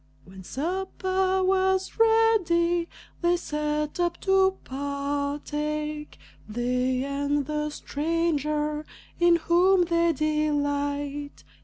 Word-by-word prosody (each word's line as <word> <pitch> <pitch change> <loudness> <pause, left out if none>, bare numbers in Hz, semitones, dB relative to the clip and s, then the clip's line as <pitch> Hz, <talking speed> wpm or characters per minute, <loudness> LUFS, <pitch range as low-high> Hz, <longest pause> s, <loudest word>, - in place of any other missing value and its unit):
When 190 +1 -12
supper 375 - -1
was 380 +2 +1
ready, 370 -7 +3 0.3
they 350 0 +3
sat 300 -1 -2
up 345 -1 0
to 385 0 +3
partake 290 +2 -3 0.3
They 250 +3 0
and 285 +1 -1
the 300 +1 -2
stranger, 300 -1 -1 0.4
in 345 0 +5
whom 355 +3 +4
they 335 0 +2
delight. 290 -1 -1
300 Hz, 90 wpm, -26 LUFS, 285-350 Hz, 0.4 s, in